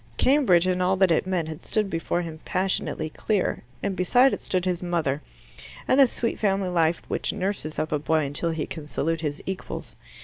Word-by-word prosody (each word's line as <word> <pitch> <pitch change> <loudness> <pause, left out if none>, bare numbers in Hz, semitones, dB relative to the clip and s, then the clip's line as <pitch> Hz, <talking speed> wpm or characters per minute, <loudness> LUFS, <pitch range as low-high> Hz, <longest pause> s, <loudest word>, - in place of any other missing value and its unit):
Cambridge 250 - +4
and 185 0 +1
all 185 +1 +3
that 190 -2 +4
it 165 - +2
meant 180 -4 0
had 160 +1 -7
stood 215 -2 0
before 175 0 -1
him 160 -2 -7
passionately 185 -4 -1
clear, 195 +5 -1 0.2
and 200 -1 -1
beside 245 +9 +4
it - - -3
stood 185 -1 -1
his 180 -2 -1
mother 165 -5 -1 0.7
and 260 - +4
the 275 - +8
sweet 235 0 -2
family 195 -2 +1
life 170 -1 +1
which - - -1
nurses 190 -6 -3
up 155 - -2
a 150 - +1
boy 155 0 +1
until 145 +4 -1
he 160 -2 -2
can 155 -3 -8
salute 165 +2 -1
his 150 -1 -3
equals. 190 -1 -5
180 Hz, 200 wpm, -25 LUFS, 160-195 Hz, 0.7 s, the